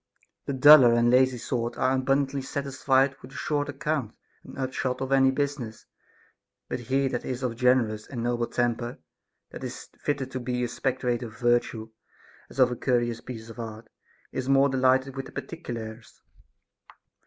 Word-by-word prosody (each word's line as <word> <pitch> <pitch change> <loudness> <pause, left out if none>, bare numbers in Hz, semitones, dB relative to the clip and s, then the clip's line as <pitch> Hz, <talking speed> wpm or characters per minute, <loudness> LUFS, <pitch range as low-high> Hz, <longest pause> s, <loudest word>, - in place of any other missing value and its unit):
The 140 - -1
duller 130 -3 +8
and 120 0 +3
lazy 130 0 +4
sort 120 0 -3
are 130 - +2
abundantly 135 +1 +1
satisfied 135 0 +1
with 130 +2 -12
a - - -13
short 145 -1 -1
account 145 -4 -2 0.3
and - - -12
upshot 130 -1 -2
of 135 0 -4
any 135 -1 +5
business. 135 -4 -3 0.8
But - - -3
he 135 +3 0
that 120 - -3
is 130 0 -4
of 125 - 0
a - - -6
generous 115 -3 +1
and 120 -4 -5
noble 120 0 0
temper, 120 0 -1 0.5
that - - -9
is - - -7
fitted 140 -3 -2
to 130 - -3
be 125 0 -2
a - - 0
spectator 125 -1 -2
of 110 - -13
virtue, 120 -2 0 0.6
as - - -14
of 130 -2 +5
a - - -2
curious 120 -2 0
piece 115 -3 -8
of 115 - -12
art, 110 -1 -7 0.4
is 130 0 -3
more 135 +1 +5
delighted 130 0 +2
with 135 0 -5
the - - -13
particulars. 115 -8 -7
130 Hz, 170 wpm, -27 LUFS, 120-135 Hz, 0.8 s, duller